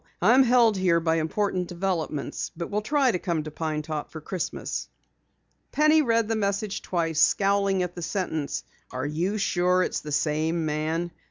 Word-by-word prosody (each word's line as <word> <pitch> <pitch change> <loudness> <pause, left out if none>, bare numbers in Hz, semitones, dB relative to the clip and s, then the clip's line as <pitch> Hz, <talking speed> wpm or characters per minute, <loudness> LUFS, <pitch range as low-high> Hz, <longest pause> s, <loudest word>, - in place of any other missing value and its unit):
I 210 +7 +5
am 260 - +7
held 240 -4 +4
here 180 -3 +3
by 165 0 +1
important 180 +2 -1
developments, 170 -5 -3
but 170 +3 -5
will 210 +1 0
try 275 +2 +2
to 180 - -2
come 170 -4 -1
to 155 - -7
Pine 155 -1 -3
Top 155 -1 -4
for 160 - -8
Christmas." 175 +3 -4 0.8
Penny 305 +1 +4
read 230 -5 +2
the 225 - 0
message 200 0 -1
twice, 165 -3 -1
scowling 195 0 +3
at 180 -1 -4
the 175 - -7
sentence: 160 -5 -2 0.3
"Are 130 +1 -4
you 170 +8 -1
sure 180 -2 +2
it - - -2
is - - -3
the 150 - -7
same 155 +3 0
man?" 160 +3 -1
180 Hz, 180 wpm, -26 LUFS, 160-205 Hz, 0.8 s, am